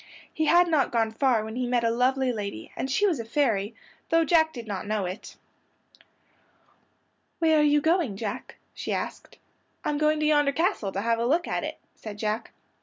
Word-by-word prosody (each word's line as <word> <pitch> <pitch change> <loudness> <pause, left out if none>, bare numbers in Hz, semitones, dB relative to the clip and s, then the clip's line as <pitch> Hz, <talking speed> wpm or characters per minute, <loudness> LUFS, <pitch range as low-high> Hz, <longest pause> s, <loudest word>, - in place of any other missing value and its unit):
He 315 - 0
had 350 +3 +5
not 305 -6 +2
gone 225 -2 +1
far 235 -1 +2
when 220 +1 -7
he 250 0 -1
met 245 -1 +1
a 230 - +2
lovely 255 +2 +1
lady, 200 - -6
and 265 - -3
she 340 +10 +2
was 345 -10 +1
a - - -3
fairy, 225 -4 0 0.3
though 330 0 +3
Jack 320 0 +4
did 235 -6 -8
not 200 -3 -5
know 210 -2 -1
it. 185 +3 -7 2.0
"Where 320 -2 +3
are - - +5
you 295 0 +4
going, 320 - +1
Jack?" 205 -1 -5 0.2
she - - -4
asked. - - -5 0.5
"I'm 295 -1 0
going 305 0 +2
to 305 - 0
yonder 295 -2 +3
castle 325 - 0
to 195 - -2
have 230 +1 +1
a 235 - 0
look 330 +6 +1
at - - -2
it," - - -5 0.2
said 210 -2 -9
Jack. 215 +1 -3
255 Hz, 195 wpm, -26 LUFS, 220-305 Hz, 2.0 s, had